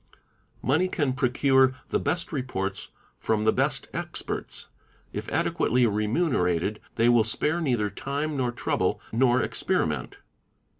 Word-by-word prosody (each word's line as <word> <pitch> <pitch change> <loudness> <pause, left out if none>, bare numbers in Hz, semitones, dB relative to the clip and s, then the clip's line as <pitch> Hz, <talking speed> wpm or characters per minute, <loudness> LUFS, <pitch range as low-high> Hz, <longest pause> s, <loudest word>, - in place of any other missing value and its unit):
Money 160 +8 +2
can 145 -7 0
procure 130 0 +3
the - - +1
best 170 +4 -1
reports 115 - -3 0.3
from 110 -1 0
the 110 - +4
best - - 0
experts, - - -4 0.5
if - - -5
adequately 125 +1 +2
remunerated 105 - +1 0.2
they 115 +1 +3
will 120 -2 +5
spare 150 +9 0
neither 120 -9 +1
time, 145 +7 -3
nor 125 -3 0
trouble, 120 - 0
nor 125 +2 +3
experiment. - - -1
125 Hz, 120 wpm, -26 LUFS, 110-140 Hz, 0.5 s, will